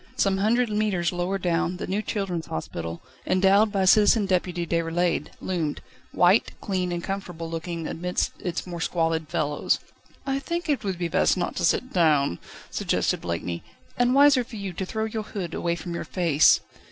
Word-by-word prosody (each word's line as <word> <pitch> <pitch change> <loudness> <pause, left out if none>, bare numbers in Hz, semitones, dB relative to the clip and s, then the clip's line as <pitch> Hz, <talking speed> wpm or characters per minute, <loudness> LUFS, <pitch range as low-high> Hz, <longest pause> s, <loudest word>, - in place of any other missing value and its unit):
Some 195 -5 +2
hundred 235 +4 +2
mètres 210 -5 +1
lower 180 +2 -1
down, 175 -1 0
the - - -4
new 195 +3 -1
children's 195 -7 -3
hospital, 80 +2 -5 0.2
endowed 195 +3 +4
by 195 -2 +1
Citizen 210 +2 +5
Deputy 180 -2 0
Déroulède, 170 +1 0
loomed, 165 -5 -2 0.3
white, 180 +5 +4
clean, 185 -2 -2
and 175 -1 -3
comfortable 180 -4 -5
looking, 165 0 -4
amidst 180 +3 -1
its 175 -2 -3
more 175 -2 -6
squalid 165 -2 0
fellows. 145 -1 0 0.5
"I 270 0 0
think 340 +4 -3
it 280 -7 0
would 190 -3 -2
be 175 -1 -1
best 185 +2 +2
not 175 - -2
to - - -1
sit 255 - +1
down," 150 - +3 0.3
suggested - - 0
Blakeney, 85 0 -3 0.3
"and 245 +1 +2
wiser 280 -2 +6
for 235 - -11
you 200 -3 -5
to 185 +2 -4
throw 220 +2 -2
your 220 0 -3
hood 190 -5 -5
away 170 0 -1
from 170 +1 -6
your 170 - -3
face." 165 -5 +4
180 Hz, 175 wpm, -25 LUFS, 170-205 Hz, 0.5 s, wiser